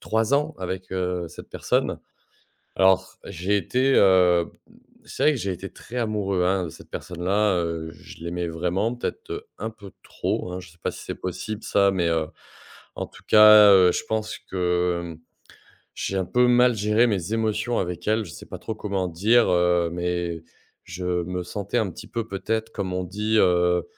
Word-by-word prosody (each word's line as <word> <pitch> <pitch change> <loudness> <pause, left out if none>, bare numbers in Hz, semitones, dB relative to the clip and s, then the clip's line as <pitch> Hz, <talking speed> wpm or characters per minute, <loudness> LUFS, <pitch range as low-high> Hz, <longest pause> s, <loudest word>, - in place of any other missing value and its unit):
3 110 +3 0
ans 150 +2 0
avec, 95 0 -5
heu, 90 -1 -2
cette - - -12
personne. - - -1 0.8
Alors 95 0 +3
j'ai 100 +2 -1
été, 130 +8 +1
heu, 90 -3 +5
b - - -15 0.2
mmh, - - -20 0.3
c'est - - -5
vrai 155 - +5
que 140 - -3
j'ai 100 -4 -2
été 95 +2 -8
très 125 - -11
amoureux, 105 -5 -1
hein, 95 0 +1
de - - -7
cette - - -15
personne 90 -1 -6
là, 100 +2 +2
heu, 85 -2 -3
je 85 - -14
l'aimais 85 0 -3
vraiment 90 +8 -1
peut-être, 425 - -6
heu, 420 +2 -5
un 110 - -4
peu 100 -4 -13
trop 90 - -3
hein. 90 - -5
Je 90 - -13
sais 85 - -25
pas - - -1
si - - -10
c'est - - -5
possible 105 +4 -5
ça, 100 -1 +3
mais, 90 -3 0
heu, 80 -1 0 0.7
en - - -3
tout - - -17
cas, 105 -1 +8
heu, 90 -2 +6
je - - -2
pense 110 -1 -2
que, 90 -1 -1
mmh, 85 -2 -8 0.8
j'ai 95 - -2
un 95 - 0
peu 125 +6 +3
mal 125 0 +4
gérer 105 +3 +3
mes 100 -2 -2
émotions 110 +1 0
avec 90 0 -4
elle. 110 +1 +2
Je - - -10
sais - - -11
pas - - -8
trop 110 - -5
comment 100 -3 -2
dire, 110 +8 +3
heu, 90 -1 +2
mais 85 -1 -3 0.4
je 90 - -7 0.2
me 90 +1 -3
sentais 100 +5 -4
un 110 -4 0
petit 110 - -10
peu, 115 0 -4
peut-être, 110 +3 -3
comme 95 -4 -4
on 90 0 -2
dit, 105 +5 -1
heu, 90 -1 +3
95 Hz, 200 wpm, -24 LUFS, 90-110 Hz, 0.8 s, cas